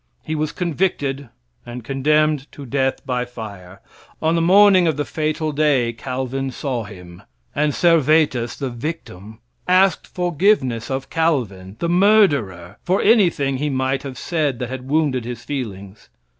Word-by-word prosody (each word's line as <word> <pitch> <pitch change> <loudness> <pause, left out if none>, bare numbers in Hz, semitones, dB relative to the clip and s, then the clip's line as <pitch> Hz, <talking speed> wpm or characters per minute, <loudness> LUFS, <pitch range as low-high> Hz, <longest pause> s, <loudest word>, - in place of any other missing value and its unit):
He 155 - -4
was 155 0 -1
convicted 145 -6 -2 0.3
and 120 0 -8
condemned 150 +2 +1
to 140 - -9
death 135 +1 -1
by 125 -1 -1
fire. 100 -6 -10 0.4
On 160 +1 +1
the 165 - +1
morning 190 0 +6
of 155 -3 0
the 145 - -1
fatal 155 0 -2
day, 140 -5 +1
Calvin 130 +2 -4
saw 125 -3 -4
him; 90 -3 -12 0.3
and 150 0 +1
Servetus, 155 -7 +2
the 135 -3 -4
victim, 115 - -7 0.3
asked 185 -1 +3
forgiveness 175 - 0
of 135 0 -4
Calvin, 115 - -1
the 170 - -2
murderer, 170 - +2
for 185 +2 0
anything 170 - +3
he 150 +3 -1
might 130 0 -1
have 135 -3 -8
said 150 -5 -1
that 125 +1 -5
had 130 0 -7
wounded 145 -5 +1
his 120 0 -7
feelings. 100 - -6
135 Hz, 145 wpm, -20 LUFS, 120-160 Hz, 0.4 s, morning